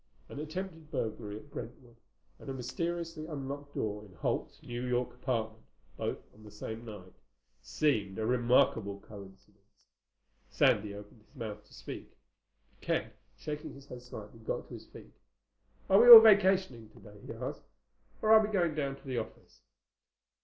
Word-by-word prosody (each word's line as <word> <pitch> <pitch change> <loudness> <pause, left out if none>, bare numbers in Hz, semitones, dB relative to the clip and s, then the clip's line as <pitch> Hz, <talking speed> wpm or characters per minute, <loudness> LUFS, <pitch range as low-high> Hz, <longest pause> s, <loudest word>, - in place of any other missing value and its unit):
An - - -8
attempted 165 0 -6
burglary 110 -7 -4
in 130 - -13
Brentwood 125 -4 -9 0.4
and - - -10
a 135 - -4
mysteriously 165 +5 -4
unlocked 145 -1 -6
door 105 -1 -3
in 95 -4 -16
Holt's - - -3
New 120 0 -5
York 125 0 -1
apartment, 110 -4 -3 0.3
both - - -3 0.2
on 110 - -19
the 105 - -12
same 110 +2 -7
night, 100 -5 -10 0.5
seemed 105 -11 0
a 110 - -2
remarkable 120 -4 +2
coincidence. 100 0 -16 0.6
Sandy 105 -1 +2
opened 105 +2 -12
his 110 - -29
mouth 105 -4 -6
to - - -21
speak. - - -8 0.6
But - - -33
Ken, - - -1 0.3
shaking 150 -1 -6
his 140 0 -14
head 125 -3 -10
slightly, 115 -2 -11
got 110 - -4
to - - -10
his - - -10
feet. - - -14 0.7
"Are 195 +3 +6
we 245 - +7
all 235 -2 +16
vacationing 190 - +4
today?" 105 -1 -16
he - - -6
asked. - - -6 0.6
"Or 215 0 +6
are 220 - +9
we 215 - -2
going 175 -6 +1
down 140 -2 -2
to 140 - -19
the 130 -3 -1
office?" 110 - -10
125 Hz, 160 wpm, -31 LUFS, 105-155 Hz, 0.7 s, all